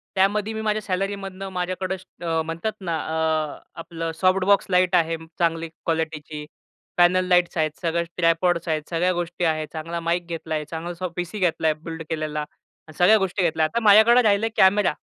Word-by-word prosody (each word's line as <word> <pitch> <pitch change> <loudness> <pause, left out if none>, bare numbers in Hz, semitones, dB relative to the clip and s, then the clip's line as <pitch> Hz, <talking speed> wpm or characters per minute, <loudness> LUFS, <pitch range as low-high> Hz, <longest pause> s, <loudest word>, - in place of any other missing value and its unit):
त्यामध्ये 205 +3 +1
मी 220 - -4
माझ्या 215 0 0
सॅलरीमधनं 195 0 -4
माझ्याकडं 180 -2 -3
म्हणतात 165 +6 -3
ना 170 -3 -2
अ, 160 -1 -1 0.2
आपलं 165 0 -5
सॉफ्ट 185 0 +3
बॉक्स 200 0 +4
लाईट 180 0 +3
आहे 165 -1 +2 0.2
चांगली 165 -1 0
क्वालिटीची, 160 -2 -4 0.5
पॅनल 180 +1 +4
लाइट्स 180 0 +3
आहेत 155 -1 +1
सगळ्या, 170 -1 0
ट्रायपॉड्स 170 0 +2
आहेत, 155 -1 0
सगळ्या 175 +2 +1
गोष्टी 175 0 -3
आहे, 155 -1 0
चांगला 165 +2 -4
माईक 170 +1 -1
घेतला 165 -1 -4
आहे, 150 -1 -3
चांगला 165 +3 -6
सॉ 180 +1 -4
पीसी 180 +4 -4
घेतला 165 -3 +1
आहे, 155 - +3
बिल्ड 165 -1 -6
केलेला 155 -1 -3
आणि 150 +1 -15
सगळ्या 185 +5 +6
गोष्टी 195 -1 -1
घेतल्या. 160 -2 +2
आता 155 +9 -1
माझ्याकडं 220 +4 +7
राहीलं 210 -2 +3
आहे 225 - -2
कॅमेरा. 190 -2 +4
175 Hz, 175 wpm, -23 LUFS, 160-190 Hz, 0.5 s, माझ्याकडं